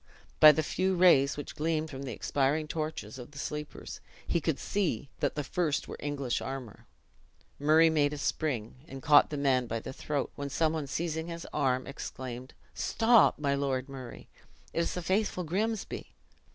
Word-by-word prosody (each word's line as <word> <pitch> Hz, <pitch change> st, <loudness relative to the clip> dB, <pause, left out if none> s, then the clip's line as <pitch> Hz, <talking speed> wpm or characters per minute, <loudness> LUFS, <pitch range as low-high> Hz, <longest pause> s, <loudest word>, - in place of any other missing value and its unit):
By 155 Hz, -, +11 dB
the 155 Hz, +1 st, 0 dB
few 185 Hz, +5 st, 0 dB
rays 155 Hz, -6 st, +5 dB
which 145 Hz, -, -6 dB
gleamed 155 Hz, 0 st, -1 dB
from 135 Hz, -1 st, -7 dB
the 135 Hz, -2 st, -5 dB
expiring 145 Hz, +7 st, 0 dB
torches 155 Hz, -7 st, -4 dB
of 120 Hz, -, -9 dB
the 145 Hz, -, -14 dB
sleepers, 150 Hz, +1 st, -6 dB, 0.3 s
he 170 Hz, -, 0 dB
could 155 Hz, -2 st, 0 dB
see 165 Hz, -, -1 dB
that -, -, 0 dB
the 150 Hz, -, -2 dB
first 155 Hz, 0 st, -1 dB
wore -, -, -6 dB
English 140 Hz, -4 st, -2 dB
armor. 130 Hz, -5 st, -7 dB, 0.7 s
Murray 160 Hz, +3 st, +5 dB
made 145 Hz, -2 st, +2 dB
a 150 Hz, -, -5 dB
spring, 130 Hz, -7 st, -2 dB
and 135 Hz, -3 st, -9 dB
caught 150 Hz, -1 st, +6 dB
the 150 Hz, -, -4 dB
man 130 Hz, -3 st, +2 dB
by 115 Hz, 0 st, -2 dB
the 120 Hz, -, -7 dB
throat; 145 Hz, 0 st, -3 dB
when 140 Hz, 0 st, -5 dB
some 155 Hz, +4 st, +1 dB
one 155 Hz, -3 st, -3 dB
seizing 160 Hz, +3 st, -2 dB
his 170 Hz, -1 st, -6 dB
arm, 130 Hz, -3 st, +1 dB
exclaimed, 130 Hz, -2 st, -7 dB, 0.2 s
"Stop, 230 Hz, -1 st, +4 dB
my 140 Hz, -2 st, 0 dB
Lord 135 Hz, -2 st, -1 dB
Murray! 130 Hz, -3 st, -9 dB, 0.5 s
it -, -, -1 dB
is 170 Hz, -, 0 dB
the 180 Hz, -, -4 dB
faithful 190 Hz, 0 st, 0 dB
Grimsby." 210 Hz, +6 st, -3 dB
145 Hz, 180 wpm, -30 LUFS, 135-160 Hz, 0.7 s, By